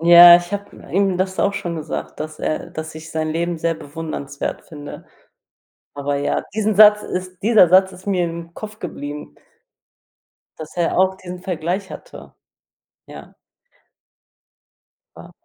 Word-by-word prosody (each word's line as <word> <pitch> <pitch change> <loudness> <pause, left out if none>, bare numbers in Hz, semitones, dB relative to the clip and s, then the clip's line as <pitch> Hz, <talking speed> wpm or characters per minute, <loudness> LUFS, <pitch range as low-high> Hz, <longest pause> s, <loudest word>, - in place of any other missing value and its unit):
Ja, 175 +1 +10
ich 175 +2 -6
habe 200 0 -5 0.2
ihm 195 -1 +2
das 185 0 -2
auch 200 0 +1
schon 170 -3 -4
gesagt, 155 0 -6
dass 155 0 -6
äh, 165 +2 -3
dass 155 -1 -6
ich 160 0 -10
sein 155 0 -2
Leben 170 +1 -1
sehr 165 +1 0
bewundernswert 145 -2 -5
finde, 145 -2 -10 0.9
aber 140 0 -2
ja, 145 - -1
diesen 215 0 0
Satz 210 0 +8
ist 185 -1 -6
dieser 215 -4 +6
Satz 190 +1 +5
ist 185 +1 -14
mir 185 -3 +1
im 170 0 -7
Kopf 215 +2 -8
geblieben 145 - -7 1.3
dass 155 +1 -9
er 175 0 0
auch 190 0 +3
diesen 180 -1 -9
Vergleich 180 +2 -3
hatte. - - -11 0.7
Ja. - - -12 1.8
Ja. - - -12
175 Hz, 145 wpm, -20 LUFS, 155-190 Hz, 1.8 s, Ja